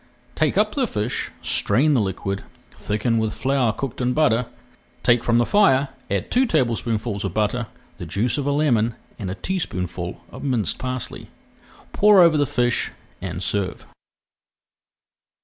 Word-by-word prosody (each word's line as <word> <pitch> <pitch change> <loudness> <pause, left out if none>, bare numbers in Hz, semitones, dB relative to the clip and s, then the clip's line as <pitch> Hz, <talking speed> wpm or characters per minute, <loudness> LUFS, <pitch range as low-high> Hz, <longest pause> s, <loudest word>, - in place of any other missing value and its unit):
Take - - +1
up - - +3
the 270 -5 +1
fish, 105 - -2
strain 135 +9 +3
the 125 - +3
liquid, 100 0 -3 0.3
thicken 115 +2 -1
with 110 -1 -1
flour 130 -3 +1
cooked 130 +2 -5
in 125 0 +1
butter, 125 -6 +2 0.6
take 120 -1 +4
from 115 0 +2
the 120 - +3
fire, 140 - +4 0.2
add 100 -2 -2
two 255 +1 +3
tablespoonfuls 115 - 0
of 95 -4 -4
butter, 110 +2 0 0.3
the 85 - -6
juice 110 - 0
of 140 - -2
a - - +2
lemon 120 -6 +2 0.2
and 100 -4 -4
a 95 - -4
teaspoonful 90 - -4
of - - -9
minced 120 - 0
parsley. 130 -2 -5 0.6
Pour 210 -1 +6
over 170 -2 +6
the 145 -2 +2
fish 120 +1 +1 0.3
and 90 -1 -4
serve. 95 0 -2
120 Hz, 150 wpm, -22 LUFS, 105-140 Hz, 0.6 s, Pour